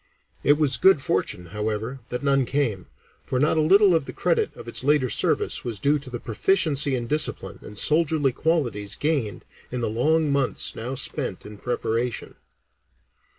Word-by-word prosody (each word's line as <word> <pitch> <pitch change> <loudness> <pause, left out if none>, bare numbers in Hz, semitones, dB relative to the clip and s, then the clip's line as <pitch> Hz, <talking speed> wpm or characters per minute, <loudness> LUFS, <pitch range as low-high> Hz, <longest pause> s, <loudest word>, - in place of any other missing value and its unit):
It 145 - +6
was 140 -5 +2
good 190 +4 +5
fortune, 95 -8 -1
however, 110 +4 -3
that 125 +3 -4
none 135 -1 +3
came, 120 -8 -1 0.4
for 125 - -2
not 150 +3 +2
a 160 - +3
little 195 +4 +5
of 160 -4 +1
the - - -6
credit 450 -3 0
of - - -11
its 115 - -1
later 140 -4 +2
service - - 0
was 115 -3 -3
due 145 +6 +2
to 130 - -8
the 120 -1 -5
proficiency 140 - +1
in 120 -2 -3
discipline 150 +6 -2
and 105 - -11
soldierly 150 0 +2
qualities 120 -9 -1
gained 145 -9 -2 0.3
in 125 0 -3
the 115 - -1
long 155 +6 +2
months 140 -2 0
now 125 +4 -4
spent 130 - -4
in 105 -1 -10
preparation. 120 0 -2
135 Hz, 170 wpm, -24 LUFS, 115-150 Hz, 0.4 s, It